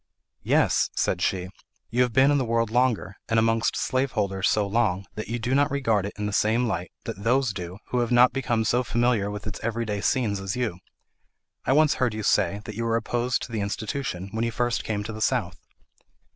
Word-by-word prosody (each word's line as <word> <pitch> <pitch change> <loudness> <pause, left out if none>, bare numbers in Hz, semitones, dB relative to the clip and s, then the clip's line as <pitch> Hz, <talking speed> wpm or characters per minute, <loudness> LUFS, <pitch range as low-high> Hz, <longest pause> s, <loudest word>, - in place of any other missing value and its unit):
"Yes," - - +2
said - - 0
she, 90 -1 0 0.4
"you 120 +2 +2
have 125 -1 +2
been 135 +5 +5
in 145 - +3
the - - +1
world 115 -2 0
longer, 120 -5 +1
and 115 - +2
amongst 115 0 +2
slaveholders 105 -7 0
so 105 -1 +2
long 100 -3 0
that 110 - -6
you 115 - -2
do 120 +2 -2
not 145 +2 +3
regard 115 -8 +1
it - - -7
in 105 - -3
the 105 - -2
same 110 +4 +2
light 90 -5 -3
that 100 - -6
those 125 0 +2
do 90 -1 -6
who 125 - 0
have 120 0 0
not 125 +1 +6
become 120 -4 0
so 120 +3 +2
familiar 120 -4 +1
with 105 0 -6
its 110 - -5
every 115 +1 -2
day 105 -2 -3
scenes 110 -6 +1
as 95 0 -3
you. 120 -8 -2 0.9
I 130 - +3
once 155 +1 +5
heard 120 -4 +1
you 110 - -4
say, 100 +1 +2
that 110 - -6
you 115 - -3
were 115 0 +1
opposed 120 +2 -1
to - - -8
the 110 -2 -2
institution, 100 -1 -3
when 110 +1 -2
you 115 - +1
first 120 0 -1
came 105 -2 -2
to 110 +2 -6
the 110 - -7
South." 105 -8 0
115 Hz, 220 wpm, -25 LUFS, 105-125 Hz, 0.9 s, not